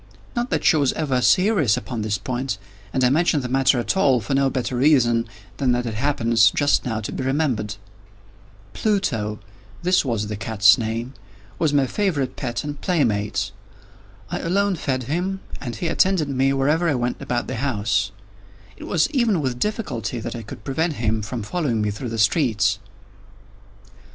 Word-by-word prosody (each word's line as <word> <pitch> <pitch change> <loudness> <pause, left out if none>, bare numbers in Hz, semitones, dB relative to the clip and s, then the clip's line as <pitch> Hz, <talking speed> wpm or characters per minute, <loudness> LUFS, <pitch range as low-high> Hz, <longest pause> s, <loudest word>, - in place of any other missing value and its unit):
Not 240 +1 -1
that - - -1
she 160 - +5
was 140 -3 +2
ever 135 -5 0
serious 180 - +3
upon 120 -4 -4
this 105 -1 -1
point—and 105 -3 -4
I 125 - +4
mention 155 0 +2
the 125 - -4
matter 130 0 +3
at 120 - -1
all 135 -10 +4
for 115 +5 -3
no 135 0 +3
better 130 -1 -2
reason 120 -4 +3 0.3
than 130 -3 +2
that 120 0 -1
it 115 - -3
happens, 115 -2 +3
just 145 -1 +1
now, 110 -3 -2
to 105 - -5
be - - -4
remembered. 130 -7 0 1.0
Pluto—this 115 - -1
was 115 -6 -1
the 105 0 -4
cat's 105 -2 +4
name—was 110 +3 -4
my 140 -2 +3
favorite 140 -6 -1
pet 120 -3 -3
and 145 -1 -6
playmate. 115 - 0 0.8
I - - -2
alone 195 +3 +1
fed 130 -5 -2
him, 180 +9 -2 0.2
and 120 -4 -5
he 170 - -3
attended 170 -2 +2
me 135 0 +2
wherever 150 +5 +2
I 145 - +1
went 120 0 -2
about 120 -1 -1
the - - -4
house. 110 -5 0 0.7
It - - -9
was 165 - +2
even 235 - +2
with 130 -4 -2
difficulty 130 - -2
that 110 - -5
I 115 - -5
could 105 -1 -10
prevent 160 +7 -1
him 110 -4 -1
from 110 +2 -5
following 130 -2 -1
me 105 -1 0
through 115 +4 -5
the 115 - -4
streets. 110 - +2
130 Hz, 170 wpm, -22 LUFS, 110-150 Hz, 1.0 s, she